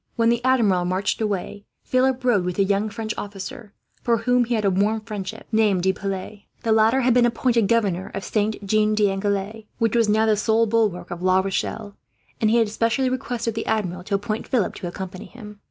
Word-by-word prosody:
When 230 -1 +3
the 235 +1 +1
Admiral 225 -9 +3
marched 185 +5 -1
away, 205 -1 -3 0.2
Philip 255 0 +1
rode 235 -7 +3
with 180 0 -3
a 200 - +4
young 200 +2 0
French 220 0 -4
officer, 200 +1 -8 0.3
for 235 -1 +2
whom 245 +2 +2
he 240 +1 -1
had 215 -2 -1
a 195 - +3
warm 210 +4 +1
friendship, 215 0 -7
named 210 -5 +2
De 190 0 +2
Piles. 195 +1 -5 0.2
The 225 - 0
latter 220 +4 +4
had 250 -1 +3
been 240 0 +4
appointed 235 -2 +1
governor 195 -5 0
of 195 - -4
Saint 215 0 -1
Jean 215 +1 +2
d'Angely, 205 +1 -1
which 230 0 +1
was 230 -2 +3
now 220 +1 +3
the 215 -1 +3
sole 220 +2 +2
bulwark 215 -5 0
of 175 0 -6
La 185 0 +3
Rochelle; 200 +2 -3 0.5
and 215 - +3
he 230 - +3
had 225 -2 +2
specially 230 +4 0
requested 245 -3 -3
the 225 - -4
Admiral 185 -5 -1
to 200 - -1
appoint 215 +2 -3
Philip 235 -7 0
to 180 - -6
accompany 185 +1 -7
him. 210 -4 -12
215 Hz, 205 wpm, -23 LUFS, 195-230 Hz, 0.5 s, a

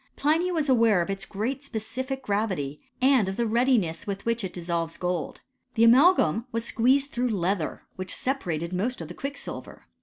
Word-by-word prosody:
Pliny 320 +5 +2
was 315 -4 0
aware 230 -8 +4
of 195 - -4
its 195 0 -4
great 245 +8 -3
specific 260 +2 -4
gravity, 190 -9 -2 0.2
and 260 -7 +4
of 190 - -5
the 235 - +1
readiness 225 -6 +1
with 195 -1 -4
which 230 -1 0
it 190 - -3
dissolves 170 -2 -3
gold. 180 -2 -3 0.3
The 225 - +4
amalgam 235 - +5
was 230 0 -2
squeezed 270 +5 +2
through 245 +1 0
leather, 190 -4 -1
which 185 0 -1
separated 175 - -2
most 225 +8 -1
of 165 -2 -7
the - - -7
quicksilver. 275 +7 -7
225 Hz, 175 wpm, -26 LUFS, 180-260 Hz, 0.3 s, amalgam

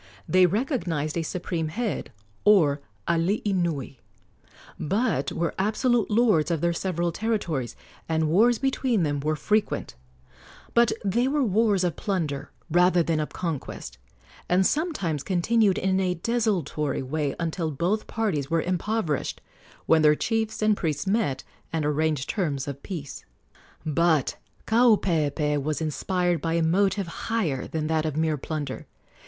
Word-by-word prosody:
They 185 0 +5
recognized 180 - -1
a 170 - 0
supreme 165 -1 -3
head, 215 - -3 0.3
or 155 -9 +4 0.3
alii 185 +5 +1
nui, 155 -8 -2 0.8
but 195 - 0
were 170 0 -1
absolute 225 +3 +1
lords 210 -9 +3
of 165 -2 0
their 170 +2 +1
several 175 -1 -1
territories, 170 - -2 0.3
and 160 -1 +1
wars 225 +9 +4
between 260 -6 +1
them 145 -2 0
were 155 +2 0
frequent; 210 - 0 0.8
but 235 0 +4
they 235 +6 +2
were 285 +1 +1
wars 210 -3 +2
of 175 -2 -1
plunder 160 -9 -2 0.2
rather 180 +1 +4
than 160 -1 0
of 150 - -2
conquest, 160 - -5 0.5
and 185 +2 +3
sometimes 245 - 0
continued 195 +4 +2
in 190 0 +1
a 180 -1 0
desultory 175 - -1
way 145 +1 -2
until 165 -1 -1
both 175 +9 -1
parties 180 -12 -1
were 165 -1 +1
impoverished, 180 -3 -1 0.5
when 160 -1 +4
their 150 0 +6
chiefs 220 +3 -1
and 215 0 +4
priests 155 -5 -2
met 195 - 0 0.3
and 160 -2 -1
arranged 150 -2 0
terms 145 -10 -2
of 140 -1 -6
peace. 160 -8 -7 0.6
But 160 -2 +2 0.3
Kaupeepee 165 - +2
was 150 +1 -2
inspired 175 +2 0
by 165 -1 -1
a 170 0 +2
motive 195 +4 +2 0.2
higher 175 - 0
than 155 -1 -3
that 160 0 0
of 150 -1 -3
mere 160 -1 +1
plunder. 145 -2 -5
170 Hz, 140 wpm, -26 LUFS, 155-210 Hz, 0.8 s, their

